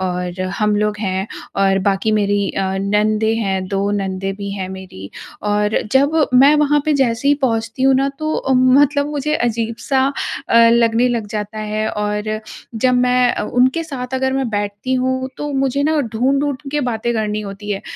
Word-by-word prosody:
और 180 -1 -3 0.2
हम 210 -1 +2
लोग 210 0 0
हैं 190 -1 -2 0.3
और 195 0 +3
बाकी 195 +2 0
मेरी 205 -1 +1
अ, - - -2 0.2
नंदे 215 +2 +1
हैं, 195 -4 -1
2 200 0 -1
नंदे 195 -1 -2
भी 200 0 -6
हैं 190 -2 -4
मेरी, 185 - -9 0.3
और 210 0 +1
जब 280 +4 +3 0.2
मैं 275 +4 +7
वहाँ 295 0 +3
पर 310 - +3
जैसे 260 0 +1
ही 290 - +5
पहुँचती 230 0 -1
हूँ 270 0 +5
ना, 270 +1 +2
तो 310 +3 -4
ओ 265 - -1
मतलब 280 +3 +4
मुझे 295 0 -2
अजीब-सा 235 +3 0 0.4
अ, - - +3
लगने 235 +1 +3
लग 235 -3 -2
जाता 210 0 -5
है 215 0 -2
और 210 0 -2 0.5
जब 250 +3 +2
मैं 250 0 +3
अ, - - -3
उनके 260 +8 +1
साथ 260 -4 -6
अगर 265 0 0
मैं 265 -2 -1
बैठती 205 +4 -2
हूँ, 260 0 -1
तो 295 - -4
मुझे 270 0 0
न 310 -1 +2
ढूँढ-ढूँढ 275 +4 +1
के 295 +1 0
बातें 235 0 -1
करनी 215 -1 -1
होती 205 0 -7
है 200 -1 -2
225 Hz, 180 wpm, -18 LUFS, 205-265 Hz, 0.5 s, मैं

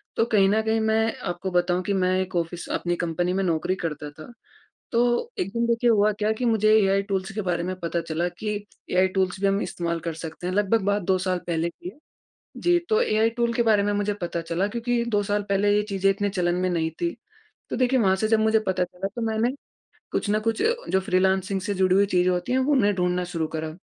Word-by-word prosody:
तो 225 - +2
कहीं 205 -4 +3
न 215 +2 +2
कहीं 220 0 0
मैं 220 0 +1
आपको 185 +2 -3
बताँऊ 175 0 +1
कि 200 - -1
मैं 185 -1 +1
एक 185 0 -5
ऑफिस 170 0 -2
अपनी 175 0 -1
कंपनी 175 +1 -1
में 195 +1 0
नौकरी 175 +1 0
करता 150 -2 -4
था। 155 +9 -12 0.6
तो 240 - +1
एक 180 - -1
दिन, 235 +1 0
देखिए 235 +1 +2
हुआ 210 -1 +4
क्या 210 0 +1
कि 220 +3 -4
मुझे 215 -2 +3
एआई 195 -1 +2
टूल 195 -2 -1
के 215 - -2
बारे 175 -2 -1
में 185 +2 -3
पता 170 0 -1
चला 165 +1 -2
कि 210 +4 -4 0.4
एआई 185 +1 +3
टूल्स 190 0 0
भी 200 - +2
हम 195 +1 +2
इस्तेमाल 170 -1 -3
कर 165 0 -4
सकते 165 +2 -7
हैं। 180 - -1
लगभग 205 +2 +2
बात 200 +1 +1
2 185 +1 +2
साल 185 -1 -1
पहले 170 -1 0
की 175 - -10
है। 200 - -12 0.6
जी, 350 0 +3
तो 440 +1 +3
एआई 220 - +2
टूल्स 235 0 -1
के 235 - +2
बारे 215 -3 +3
में 205 - 0
मुझे 205 0 0
पता 170 -1 -2
चला 170 +4 -1
क्योंकि 235 +2 -1
2 210 -3 +1
साल 205 +1 -1
पहले 200 +1 +2
ये 210 - +3
चीज़ें 195 0 +1
इतने 205 +1 -1
चलन 175 -3 0
में 185 +1 0
नहीं 165 -2 0
थी। 170 0 -1 0.6
तो - - -2
देखिए 255 +1 +2
वहाँ 190 -5 +3
से 215 +3 0
जब 225 0 +3
मुझे 220 0 +3
पता 185 -1 +1
चला, 180 +2 -5
तो 235 - -3
मैंने 220 +2 +1 0.6
कुछ - - -1
ना 210 +1 +2
कुछ 225 0 -1 0.3
जो 190 - +3
फ्रीलांसिंग 190 +1 +1
से 205 +1 -2
जुड़ी 185 -1 +2
हुई 200 +1 +5
चीज़ 180 -2 +2
होती 180 +4 -1
हैं, 260 - +3
वो 260 +3 +1
उन्हें 215 -8 +3
ढूँढना 180 0 0
शुरू 160 -2 -1
करा। 155 0 -4
195 Hz, 240 wpm, -24 LUFS, 180-220 Hz, 0.6 s, हुई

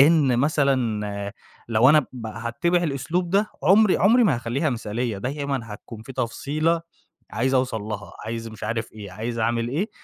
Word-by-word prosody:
إن 145 -4 +5
مثلًا 115 -8 0 0.4
لو 115 +3 +5
أنا 150 -1 +5
بقى 110 -3 -7
هاتّبع 170 +10 +1
الأسلوب 170 +4 -1
ده 200 +3 +2
عمري 195 +5 +5
عمري 230 +6 +5
ما 170 - +4
هاخليها 130 +6 -1
مثالية، 115 -1 -2
دايمًا 140 +2 -2
هتكون 110 +1 -9
في 130 - -9
تفصيلة 150 +7 0 0.5
عايز 130 +3 0
أوصل 125 -4 +1
لها، 105 -1 -6
عايز 115 0 -4
مش 110 -2 -8
عارف 115 +1 -3
إيه، 105 -3 -9
عايز 115 +5 -4
أعمل 115 +1 0
إيه، 175 - -1
125 Hz, 160 wpm, -24 LUFS, 110-150 Hz, 0.5 s, إن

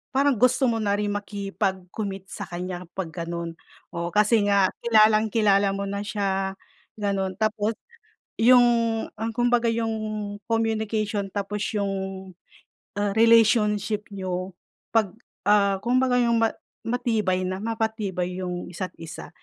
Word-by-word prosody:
parang 275 -3 +3
gusto 255 +2 +3
mo 225 -1 0
na 205 -2 +1
rin 205 0 -1
makipag-commit 195 -1 -3
sakanya 180 0 -6
pag 180 -4 -3
ganun, 170 -1 -4 0.4
oo. 170 0 -2
Kasi 210 0 +4
nga 200 -2 +4
kilalang-kilala 215 -2 +4
mo 200 - -3
na 200 0 -3
siya 195 -2 -1 0.4
ganun. 195 -2 -1
Tapos, 215 0 0 0.7
yung, 245 +1 +7 0.5
ah, 225 +2 -3
kumbaga 240 -1 +2
yung 225 0 0 0.6
communication 220 -2 0
tapos 205 0 -3 0.2
yung, 190 -1 -3 0.6
ah, 205 -1 0
relationship 215 -2 +4
niyo 185 -1 -4 0.4
pag 215 -5 +2 0.3
ah, 200 -1 +4
kumbaga 255 +1 +2
yung 235 -1 +2
ma 225 - +4 0.4
matibay 220 -6 0
na 185 +1 -3
mapatibay 215 -5 -2
yung 180 -1 -4
isa't 185 0 -5
isa. 165 0 -8
205 Hz, 120 wpm, -25 LUFS, 190-225 Hz, 0.7 s, yung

